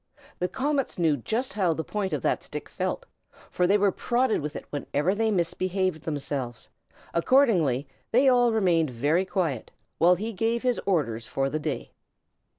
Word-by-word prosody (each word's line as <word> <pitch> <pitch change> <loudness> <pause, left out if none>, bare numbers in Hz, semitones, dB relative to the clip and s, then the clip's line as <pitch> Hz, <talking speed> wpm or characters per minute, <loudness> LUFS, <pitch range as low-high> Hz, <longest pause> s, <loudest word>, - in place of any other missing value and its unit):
The 180 - +1
comets 275 +4 -1
knew 165 -4 +3
just 225 - -2
how 190 -5 +2
the 160 - -3
point 200 0 -3
of - - -2
that - - +1
stick - - -7
felt, - - -3 0.5
for 180 - +2
they 200 +3 +4
were 200 -1 +3
prodded 240 +1 +1
with 150 +1 -5
it - - -6
whenever 145 +4 0
they 220 +2 +1
misbehaved 185 -2 0
themselves; 140 -5 -4 0.5
accordingly, 170 - +3 0.2
they 260 +4 +4
all 245 -2 +5
remained 175 -8 +2
very 145 +10 +1
quiet, 165 - -2 0.3
while 175 +2 +6
he 220 +5 -4
gave 225 +4 0
his 250 -2 +1
orders 115 - 0
for 135 0 -1
the 155 - -1
day. 150 -2 -4
180 Hz, 165 wpm, -26 LUFS, 150-225 Hz, 0.5 s, while